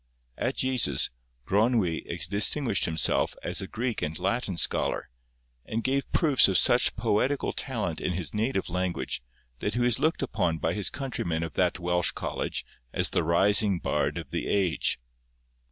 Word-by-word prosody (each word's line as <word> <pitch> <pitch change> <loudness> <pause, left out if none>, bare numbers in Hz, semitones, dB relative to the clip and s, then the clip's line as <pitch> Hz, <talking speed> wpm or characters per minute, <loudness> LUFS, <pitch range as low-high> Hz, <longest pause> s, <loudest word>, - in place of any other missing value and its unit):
At - - -2
Jesus, 130 -2 +2 0.3
Gronwy 105 -5 +1 0.3
distinguished 105 - +2
himself 80 -1 +1
as - - 0
a 95 - -5
Greek 120 +2 -3
and 75 +1 -3
Latin 100 -2 -1
scholar, 75 - 0 0.5
and 110 +1 -3
gave 135 +1 -1
proofs 150 -6 +5
of 95 -2 +3
such - - +4
poetical 130 +7 0
talent 110 -11 -3
in 90 - -1
his 85 -4 -3
native 110 -1 -1
language 90 -6 -2 0.4
that 105 - -2
he - - 0
was 120 -1 +2
looked 160 -2 +1
upon 90 -10 0
by 80 +1 -1
his 100 0 0
countrymen 85 - -3
of 80 - -5
that 90 -1 +1
Welsh 90 -1 +1
college - - -4 0.3
as - - +1
the - - +1
rising 100 +4 +3
bard - - -1
of - - -7
the - - -3
age. 95 -7 +1
100 Hz, 155 wpm, -27 LUFS, 85-120 Hz, 0.5 s, proofs